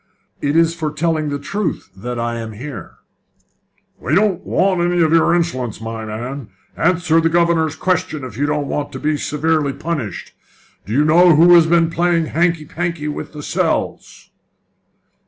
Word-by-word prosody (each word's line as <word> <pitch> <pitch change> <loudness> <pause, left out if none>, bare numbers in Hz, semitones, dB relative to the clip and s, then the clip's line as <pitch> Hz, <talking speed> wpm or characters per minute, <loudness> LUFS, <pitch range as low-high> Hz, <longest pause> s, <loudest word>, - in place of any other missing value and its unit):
It 145 +1 0
is 165 0 +4
for 160 -3 -3
telling 155 0 -1
the 145 - -2
truth 195 - -4
that 120 +5 -5
I 115 0 -2
am 110 -1 -6
here." 135 +7 -8 1.0
"We 145 - -1
don't 200 -2 +2
want 185 -2 +1
any 175 0 +1
of 160 0 +2
your 165 +1 +4
insolence, 130 -11 -2
my 115 0 -6
man! 120 +3 -6 0.3
Answer 165 -1 +2
the 165 - +2
governor's 165 -2 +2
question 160 -5 -1
if 125 -5 -8
you 145 +4 0
don't 150 -1 -1
want 145 0 -3
to 130 - -6
be 150 +2 0
severely 150 0 0
punished. 140 - -5 0.5
Do 105 - -4
you 145 +4 +3
know 170 +2 +6
who 170 +3 +7
has 170 -2 +6
been 165 0 +3
playing 170 -1 +1
hanky 170 -2 +1
panky 165 -1 -3
with 150 - -6
the 150 -1 -8
cells?" - - -2
155 Hz, 170 wpm, -18 LUFS, 140-170 Hz, 1.0 s, who